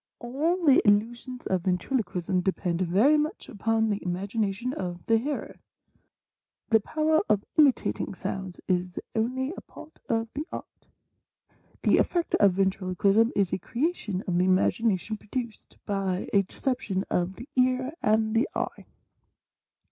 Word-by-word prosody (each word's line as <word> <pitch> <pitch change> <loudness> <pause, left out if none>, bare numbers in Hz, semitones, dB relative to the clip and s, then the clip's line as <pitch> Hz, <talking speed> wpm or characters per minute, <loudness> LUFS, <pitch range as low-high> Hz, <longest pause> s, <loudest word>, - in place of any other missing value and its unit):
All 315 +9 -1
the 275 -3 +6
illusions 235 +5 +1
of 185 -2 0
Ventrilo 185 +8 0
quism 180 0 -2
depend 180 -2 -1
very 205 - +4
much 310 +6 -3
upon 225 -1 0
the 205 - -3
imagination 200 +6 -2
of 175 -5 -5
the 225 0 +3
hearer. 285 +5 -4 1.1
The 225 -1 +5
power 310 +8 +1
of 210 -1 +2
imitating 275 -8 +2
sounds 190 -1 -5
is 180 -1 -1
only 260 +6 -1
a - - -8
part 310 +1 -14
of 225 0 +1
the 300 +4 -4
Art. - - -9 1.0
The - - +4
effect 345 -1 0
of 200 -3 +5
Ventriloquism 195 +3 +2
is 195 -4 +1
a - - 0
creation 235 - -2
of 175 -1 +1
the 180 - +3
imagination 200 +2 +1
produced 235 +1 -6
by 195 -2 -1
a 200 - +6
deception 195 -2 -2
of 180 +2 0
the 245 - -10
ear 255 +2 +2
anMhe 220 +2 +3
eye. - - -3
215 Hz, 140 wpm, -27 LUFS, 190-255 Hz, 1.1 s, the